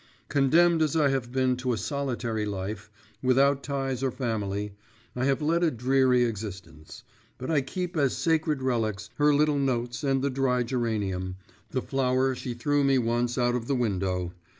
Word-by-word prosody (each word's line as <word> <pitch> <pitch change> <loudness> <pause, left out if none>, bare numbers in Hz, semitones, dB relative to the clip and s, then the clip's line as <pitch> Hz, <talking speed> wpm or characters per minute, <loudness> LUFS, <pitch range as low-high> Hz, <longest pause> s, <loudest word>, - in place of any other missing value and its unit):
Condemned 160 +4 +4
as 155 -1 +1
I 150 -3 +4
have 130 -3 -2
been 130 -1 +1
to 125 -1 -1
a - - -2
solitary 120 -5 -2
life, 105 +1 -4 0.3
without 135 +2 +3
ties 135 -2 -2
or 135 - +1
family, 105 -5 -3 0.4
I 125 +1 0
have 140 +2 +1
led 165 +3 +2
a 170 - +4
dreary 125 -1 +3
existence; 95 -8 -6 0.3
but 130 - -4
I 150 -3 +3
keep 180 +6 -4
as 140 -4 +1
sacred 155 -4 +1
relics, 110 -5 -1
her 150 0 +4
little 145 0 +3
notes 125 -1 -1
and 135 -1 +1
the 140 - +1
dry 130 -2 +1
geranium, 105 -7 -2 0.3
the 130 - -2
flower 130 0 +1
she 125 -1 -5
threw 145 +4 +1
me 135 -1 +4
once 120 +1 0
out 120 -1 +2
of 120 -1 -3
the 140 - +1
window. 95 -6 -1
130 Hz, 175 wpm, -27 LUFS, 115-140 Hz, 0.4 s, Condemned